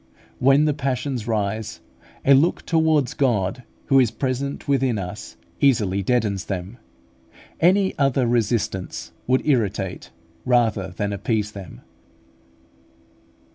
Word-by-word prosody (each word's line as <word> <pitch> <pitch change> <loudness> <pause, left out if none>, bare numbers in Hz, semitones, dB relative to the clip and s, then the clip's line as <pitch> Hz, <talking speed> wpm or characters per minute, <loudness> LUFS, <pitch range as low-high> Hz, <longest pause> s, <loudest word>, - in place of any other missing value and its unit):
When 135 +3 +4
the 150 - +2
passions 130 -4 -3
rise, 110 -1 -2 0.5
a 140 - +7
look 145 +6 +3
towards 160 -5 +2
God, 120 -3 0 0.2
who 135 - +4
is 125 -4 +4
present 130 +4 -3
within 135 -4 +1
us, 90 -2 -7 0.2
easily 105 -8 +2
deadens 105 -3 0
them. 95 +5 -5 0.8
Any 190 +3 +3
other 135 -2 +2
resistance 115 -5 -1 0.2
would 130 +1 +2
irritate 105 -9 -1 0.3
rather 115 -6 +2
than 100 +3 -3
appease 105 +1 -1
them. 100 -5 -10
120 Hz, 110 wpm, -22 LUFS, 100-135 Hz, 0.8 s, a